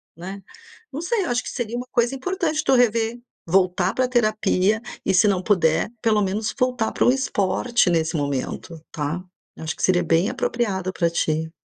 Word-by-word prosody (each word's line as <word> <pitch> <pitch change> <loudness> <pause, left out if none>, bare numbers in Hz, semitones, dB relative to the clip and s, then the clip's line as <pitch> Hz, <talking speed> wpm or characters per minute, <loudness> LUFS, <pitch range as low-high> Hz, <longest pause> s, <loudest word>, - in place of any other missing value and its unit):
né. 190 +4 -8 0.5
Não 290 +4 -5
sei, 400 +2 0
acho 245 -3 0
que - - -6
seria 240 -2 -4
uma 250 +1 -5
coisa 240 +2 +1
importante 315 0 -1
tu 270 - +3
rever, 230 -1 +2 0.3
voltar 185 +1 +2
pra 255 -1 +1
terapia 215 -3 +1 0.2
e - - +2
se 185 +3 +5
não 190 -2 +1
puder, 170 -4 +2
pelo 215 -2 +2
menos 205 +3 -1
voltar 250 -3 0
para - - +1
um - - +6
esporte 235 -3 +1
nesse 160 -1 +1
momento, 145 +3 -3
tá? 150 +4 -2 0.4
Acho 160 -1 -4
que - - -8
seria 180 -1 +3
bem 165 +3 +2
apropriado 190 -6 -1
para 170 -1 +1
ti. 160 -1 -1
205 Hz, 175 wpm, -23 LUFS, 175-245 Hz, 0.5 s, um